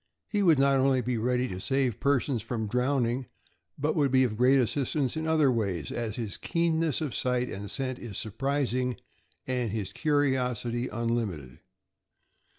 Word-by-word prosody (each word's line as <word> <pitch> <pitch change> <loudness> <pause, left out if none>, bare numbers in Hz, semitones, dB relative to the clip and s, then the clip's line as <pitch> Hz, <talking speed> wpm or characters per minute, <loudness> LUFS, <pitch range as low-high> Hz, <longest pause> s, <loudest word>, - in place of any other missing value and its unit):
He 205 - 0
would 170 -6 +5
not 135 0 +4
only 130 -1 +3
be 120 -1 -1
ready 125 +2 +1
to 90 - -5
save 130 0 0
persons 140 -3 +1
from 115 0 -3
drown 125 +4 +1
ing, 120 +2 -2 0.5
but 150 +2 0
would 145 -4 +3
be 130 0 +4
of 115 -4 0
great 125 +4 +5
assistance 130 +2 0
in 160 0 -2
other 155 -4 +4
ways, 100 - -2
as 115 -3 -3
his 115 -5 -4
keenness 165 -3 0
of 150 -5 -2
sight 125 -1 0
and 100 +1 -6
scent 130 -2 -3
is 110 -6 -7
surprising 125 +2 -1 0.5
and 125 -3 -1
his 100 -3 -4
curiosity 125 -5 0
unlimited. 105 - -3
125 Hz, 160 wpm, -28 LUFS, 115-140 Hz, 0.5 s, would